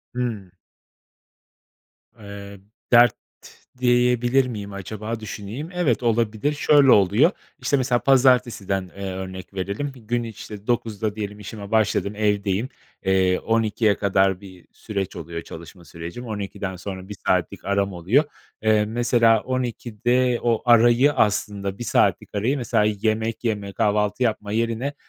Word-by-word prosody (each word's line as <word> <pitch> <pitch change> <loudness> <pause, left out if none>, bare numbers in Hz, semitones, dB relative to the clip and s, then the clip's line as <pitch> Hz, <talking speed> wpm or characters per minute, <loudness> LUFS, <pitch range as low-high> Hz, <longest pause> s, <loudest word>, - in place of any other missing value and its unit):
Hımm. 110 -7 -3 1.7
Eee, 100 -1 -10 0.3
dert 120 0 +7 0.6
diyebilir 125 +1 +3
miyim 105 -4 -6
acaba, 110 +4 -5
düşüneyim. 110 +7 -7
Evet, 145 -10 0
olabilir, 115 +4 +1
şöyle 145 -2 +5
oluyor, 105 - +5 0.3
işte, 140 - +1
mesela 125 -1 +1
pazartesiden, 120 -9 +2
eee, 100 -1 -4
örnek 95 0 -7
verelim, 100 +9 -3
bir 125 - -14
gün, 120 +2 -2
işte, 105 -2 -9
9'da 110 -3 -1
diyelim 105 -1 -5
işime 105 0 -8
başladım, 105 -2 +1
evdeyim, 105 +2 0 0.4
eee, 95 -1 +2
12'ye 110 -2 +1
kadar 95 -1 +1
bir 95 -3 -14
süreç 100 -4 -5
oluyor, 85 0 -6
çalışma 85 +2 -12
sürecim. 85 +10 -8
12'den 100 -2 -5
sonra 95 +1 -7
1 105 - -6
saatlik 90 +1 0
aram 100 0 0
oluyor. 95 - +2 0.4
Eee, 110 -1 +3
mesela 115 0 +3
12'de 125 0 -1
o 115 -2 +1
arayı, 120 +4 +5
aslında 100 -4 0
1 120 - -5
saatlik 105 - +1
arayı, 120 +8 0
mesela, 115 -3 +1
yemek 110 +2 -1
yeme, 105 -4 -2
kahvaltı 105 +4 +1
yapma 105 -3 -1
yerine 115 +5 -1
110 Hz, 130 wpm, -23 LUFS, 100-120 Hz, 1.7 s, dert